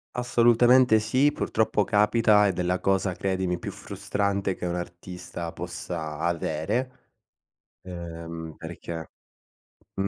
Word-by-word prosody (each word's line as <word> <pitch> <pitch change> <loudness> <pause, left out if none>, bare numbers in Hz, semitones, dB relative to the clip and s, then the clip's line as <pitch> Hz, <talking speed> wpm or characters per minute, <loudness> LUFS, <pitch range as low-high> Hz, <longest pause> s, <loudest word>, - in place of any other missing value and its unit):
Assolutamente 120 -1 +5
sì, 135 +6 +2
purtroppo 110 -6 +1
capita 105 0 +4
ed 95 -2 0
è - - +2
la 90 +1 0
cosa, 95 -1 +1
credimi, 95 -2 -1
più - - -6
frustrante 100 -1 -2
che 90 - -5
un 85 - -2
artista 90 -1 -6
possa 80 -3 -5
avere, 85 +9 -1 0.9
uhm, 85 -2 -7
perché 80 0 -7 0.9
Mh. 95 0 0
95 Hz, 115 wpm, -26 LUFS, 85-110 Hz, 0.9 s, Assolutamente